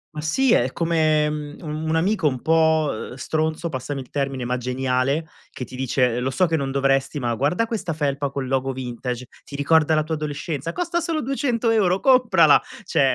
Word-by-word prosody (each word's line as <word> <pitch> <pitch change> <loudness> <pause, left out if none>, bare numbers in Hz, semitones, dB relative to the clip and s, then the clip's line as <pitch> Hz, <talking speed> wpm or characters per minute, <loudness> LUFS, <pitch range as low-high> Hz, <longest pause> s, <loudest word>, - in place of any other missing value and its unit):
Ma 150 - -4
sì, 245 +12 +2
è 125 +2 +2
come 160 -2 +2
un 150 -1 -4 0.3
un 160 - +1
amico 190 0 +1
un 130 -3 -1
po' 160 -7 +1
stronzo, 155 +3 -2
passami 135 0 -4
il 130 - -14
termine, 135 -3 -2
ma 125 +1 -1
geniale, 130 +4 -1 0.2
che 125 - -7
ti 130 - -11
dice: 125 -2 +1
"Lo 130 +2 -1
so 185 +7 +2
che 165 - 0
non 140 -3 -1
dovresti, 135 +1 +1
ma 120 -3 -1
guarda 150 - +1
questa 215 -8 -3
felpa 140 -2 -1
col 135 -1 -4
logo 135 0 -1
vintage, 125 -1 -5 0.2
ti 140 - -10
ricorda 155 +2 +3
la 155 - +2
tua 160 - -4
adolescenza, 150 0 -3
costa 345 - -1
solo 330 -2 -2
200€, 230 -8 +1
comprala." 225 - +5 0.2
Cioè, 135 -2 +2
150 Hz, 185 wpm, -22 LUFS, 130-165 Hz, 0.3 s, comprala